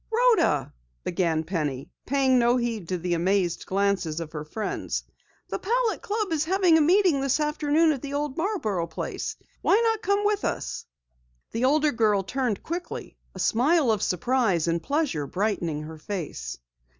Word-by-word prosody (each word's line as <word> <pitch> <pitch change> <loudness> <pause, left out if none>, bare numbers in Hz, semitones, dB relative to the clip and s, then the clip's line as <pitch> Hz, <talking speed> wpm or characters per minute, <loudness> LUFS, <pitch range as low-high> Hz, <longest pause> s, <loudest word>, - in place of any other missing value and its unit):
"Rhoda," 455 - +3 0.3
began 170 -3 0
Penny, 150 -6 -3 0.2
paying 265 -1 +3
no 240 +1 +4
heed 230 -7 -2
to 185 - 0
the 175 +1 -2
amazed 175 0 0
glances 190 -5 0
of 165 -2 -6
her 150 -2 -5
friends, 210 +8 -3 0.5
"the - - -3
Palette 470 +2 0
Club 430 -3 -2
is 310 -2 +1
having 365 -1 +4
a 320 - +5
meeting 350 -2 +4
this 275 +2 +1
afternoon 300 +1 +2
at 275 -4 -3
the 285 0 -5
old 290 -2 -2
Marborough 225 - -1
place. 160 - -4 0.3
Why 405 - +4
not 450 -2 +1
come 400 +2 +1
with 415 -1 +1
us?" - - -3 0.7
The 230 +3 0
older 300 +2 +3
girl 215 -5 +2
turned 245 0 -2
quickly, 350 +2 -5 0.2
a - - -8
smile 275 +2 +3
of 215 -3 0
surprise 190 -3 +1
and 165 0 0
pleasure 280 - -1
brightening 175 -6 -1
her 160 0 -9
face. 150 - -5
240 Hz, 160 wpm, -26 LUFS, -, 0.7 s, a